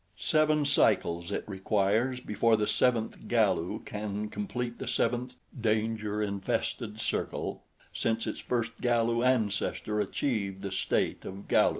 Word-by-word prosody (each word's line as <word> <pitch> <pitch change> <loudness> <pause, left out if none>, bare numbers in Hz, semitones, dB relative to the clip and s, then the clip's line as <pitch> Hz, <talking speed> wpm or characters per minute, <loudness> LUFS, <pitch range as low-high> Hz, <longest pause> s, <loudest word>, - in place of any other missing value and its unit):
Seven 155 -1 +3
cycles 85 -9 +2
it - - -1
requires 105 +5 +1
before 115 0 +2
the 105 - +1
seventh 115 0 +1
Galu 105 -3 +1
can 105 0 -4
complete 125 - -4
the - - -5
seventh 125 +1 0 0.2
danger 110 -2 0
infested 105 +2 -2
circle - - -2 0.3
since 115 0 0
its - - -3
first 115 -2 -1
Galu 120 -1 +2
ancestor 105 -3 +1
achieved 100 -3 -2
the 100 - -3
state 95 - 0
of 95 +1 -8
Galu. - - +5
110 Hz, 125 wpm, -30 LUFS, 105-120 Hz, 0.3 s, Galu